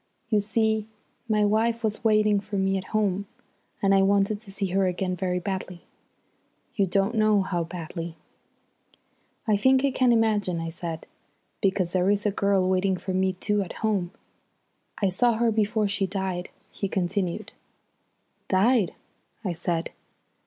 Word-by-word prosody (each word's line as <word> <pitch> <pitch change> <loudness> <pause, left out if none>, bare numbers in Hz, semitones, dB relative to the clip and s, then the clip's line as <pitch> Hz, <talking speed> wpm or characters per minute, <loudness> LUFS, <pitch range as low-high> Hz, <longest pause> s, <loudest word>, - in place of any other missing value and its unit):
You 215 -2 +3
see, 220 +1 0 0.4
my 210 -1 +3
wife 225 +3 +1
was 215 0 -1
waiting 215 -2 +4
for 205 +1 -7
me 195 0 +1
at 190 -1 -3
home, 200 -2 0 0.6
and 195 0 +4
I 195 - +5
wanted 200 +1 +2
to 215 -2 -13
see 195 0 -2
her 190 +1 +2
again 185 0 -1
very 180 -1 -1
badly 185 -1 -4 0.9
you 200 -4 +2
don't 195 +4 +1
know 215 -3 +3
how 175 -2 -1
badly." 165 -1 -6 1.3
"I 210 -2 +4
think 260 +5 +4
I 275 - +2
can 255 -1 +3
imagine," 210 -6 +2
I 165 0 -3
said. 165 -1 -6 0.6
"Because 190 -4 +1
there 185 +1 +2
is 205 0 +1
a 210 - +3
girl 195 -1 +2
waiting 185 0 +1
for 185 +1 -4
me 190 0 +1
too 205 +3 0
at 190 - -5
home." 200 -5 +1 0.9
"I 200 - +2
saw 235 +6 +2
her 230 +1 +2
before 215 0 +1
she 200 -1 0
died," 190 -2 -3 0.2
he 200 - -3
continued. 185 -1 -2 1.0
"Died?" 200 0 +3 0.5
I 180 - 0
said. 170 0 -2
195 Hz, 155 wpm, -26 LUFS, 185-215 Hz, 1.3 s, I